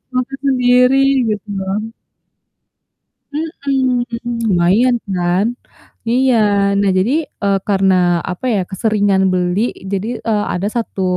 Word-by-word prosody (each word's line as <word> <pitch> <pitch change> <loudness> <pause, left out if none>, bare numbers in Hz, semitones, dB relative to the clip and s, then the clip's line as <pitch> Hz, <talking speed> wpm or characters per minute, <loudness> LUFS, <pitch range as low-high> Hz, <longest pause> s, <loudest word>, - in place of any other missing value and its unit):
makan 255 +2 -2
sendiri 250 0 +4 0.3
gitu 210 0 -3
loh. 205 +4 -3 1.4
Mhm, 275 -5 -1 0.5
lumayan 195 +9 +3 0.2
kan, 180 +3 +1 0.6
iya. 255 +1 +3 0.4
Nah 200 - +2
jadi, 205 +7 +1 0.3
eee, 200 -1 +2
karena, 185 -3 +2
apa 180 +8 -7
ya, 200 - +1
keseringan 200 -1 +1
beli 180 +2 0 0.3
jadi, 200 +2 -2 0.2
eee, 210 -2 +1
ada 185 +3 -2
1 225 -4 -3
210 Hz, 110 wpm, -16 LUFS, 190-250 Hz, 1.4 s, sendiri